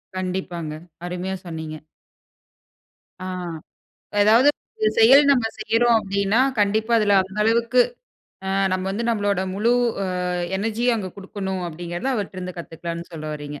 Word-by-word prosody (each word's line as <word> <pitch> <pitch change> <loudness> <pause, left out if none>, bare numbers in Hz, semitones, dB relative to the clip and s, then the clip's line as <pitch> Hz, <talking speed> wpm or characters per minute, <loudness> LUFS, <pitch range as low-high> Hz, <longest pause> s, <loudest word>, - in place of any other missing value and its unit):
கண்டிப்பாங்க, 180 -4 -3 0.3
அருமையா 180 +2 -3
சொன்னீங்க. 160 -2 -6 1.5
ஆ. - - -5 1.0
"எதாவது 225 +6 +6 0.5
செயல் 260 +6 +8
நம்ம 250 -5 +3
செய்யறோம் 230 +2 +3
அப்படீன்னா, 200 +2 0 0.2
கண்டிப்பா 215 +3 +2
அதுல 205 -2 +3
அந்த 190 +2 -8
அளவுக்கு 235 +3 +3 0.7
அ - - -2 0.2
நம்ம 185 0 -1
வந்து 215 +4 -2
நம்மளோட 205 -4 0
முழு 220 +5 +2 0.3
அ - - -1 0.5
எனர்ஜியும் 225 +4 +1
அங்க 190 -4 -4
குடுக்கணும்." 190 -1 -4
அப்படீங்கிறத 175 +8 -4
அவர்ட்டருந்து 185 -3 -5
கத்துக்கலாம்ன்னு 170 +1 -6
சொல்ல 155 -2 -7
வர்றீங்க. 145 -1 -7
195 Hz, 120 wpm, -23 LUFS, 180-225 Hz, 1.5 s, செயல்